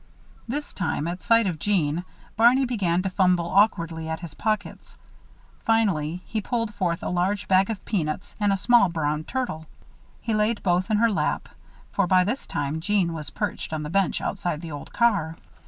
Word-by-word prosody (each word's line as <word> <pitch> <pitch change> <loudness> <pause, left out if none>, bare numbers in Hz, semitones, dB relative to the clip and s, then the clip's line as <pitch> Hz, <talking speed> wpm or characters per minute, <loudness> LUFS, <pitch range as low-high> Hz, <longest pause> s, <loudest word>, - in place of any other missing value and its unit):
This 290 +5 -4
time, 160 -4 -2
at 175 +2 -4
sight 230 +2 +4
of 175 -5 -2
Jeanne, 175 -3 0 0.3
Barney 245 +4 +5
began 185 -8 0
to 190 - -1
fumble 180 -3 +2
awkwardly 170 -5 +2
at 160 +1 -3
his 170 -4 -8
pockets. 215 +4 -3 0.6
Finally 180 -7 +1
he 220 - -3
pulled 230 0 -2
forth 175 -4 -1
a - - -2
large 190 +3 0
bag 190 +1 +4
of 220 -4 -5
peanuts 175 -1 -2
and 205 -1 +2
a 195 - +2
small 200 0 +4
brown 155 -2 -1
turtle. 240 - -3 0.5
He 225 - -2
laid 215 +1 +1
both 180 +2 +1
in 215 - +3
her 230 +1 +3
lap, 200 - -1 0.4
for 200 -2 +1
by 185 0 +5
this 235 +9 -3
time 145 +2 -2
Jeanne 185 -2 +1
was 155 -3 -6
perched - - -3
on 155 -1 -2
the 150 - -5
bench 195 0 +1
outside 175 -5 -2
the 165 -2 -7
old 145 -1 -8
car. 200 -9 +1
185 Hz, 185 wpm, -25 LUFS, 165-215 Hz, 0.6 s, Barney